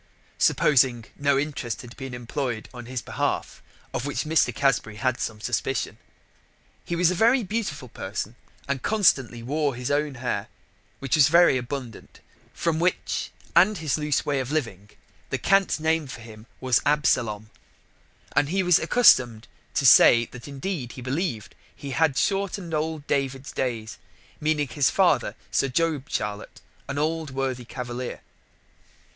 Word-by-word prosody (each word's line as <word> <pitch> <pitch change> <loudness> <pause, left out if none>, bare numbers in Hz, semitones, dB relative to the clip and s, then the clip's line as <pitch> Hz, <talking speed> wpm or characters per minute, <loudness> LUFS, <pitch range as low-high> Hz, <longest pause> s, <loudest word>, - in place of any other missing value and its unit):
supposing 130 -4 +3
that - - -22
no 140 -1 +3
interest 140 -5 -3
had 120 0 -12
been 135 -2 -7
imploy'd 120 -1 -4
on 120 -1 -9
his 130 -1 -4
behalf, - - -2 0.3
of 120 - -2
which 145 +1 -2
Mr. 160 +1 +2
Casbury 135 -6 0
had 130 +3 -1
some 110 -2 -4
suspicion. 105 - -2 0.8
He 170 - -3
was 175 0 +3
a - - 0
very 235 +7 +3
beautiful 190 - -3
person, 105 +1 -5 0.3
and 140 -2 -2
constantly 130 - +2
wore 145 +1 -1
his 125 +2 -3
own 145 -1 0
Hair, 125 0 -3 0.5
which 135 -2 0
was 145 -4 +6
very 170 -2 +5
abundant, 125 -2 -6 0.3
from 165 -2 -1
which, 180 +2 -1 0.3
and 210 +2 +5
his 155 -4 -1
loose 150 -2 0
way 140 -2 0
of 130 +1 -4
living, 110 -10 -3 0.4
the - - -1
cant 195 -4 +2
name 160 -1 +1
for 125 - -9
him 110 0 -12
was 130 -2 +2
Absalom, 115 -7 +1 0.8
and 145 - +3
he 190 +2 +1
was 180 -2 +5
accustom'd 125 - +4 0.3
to 135 - +1
say 120 -2 +8
that 125 +1 -10
indeed 140 -2 -4
he 130 - -9
believ'd 130 - -3 0.2
he 140 - -7
had 150 -1 +2
shortened 195 -3 -1
old 155 -1 -2
David's 135 -1 -2
days, 115 -4 -3 0.4
meaning 150 -1 0
his 140 -1 +2
father, - - +2 0.2
Sir 135 - +2
Job 150 0 -1
Charlett, 105 0 -4 0.3
an 140 - -3
old 160 +1 -1
worthy 130 -2 -3
cavalier. 125 0 -6
140 Hz, 150 wpm, -25 LUFS, 120-155 Hz, 0.8 s, say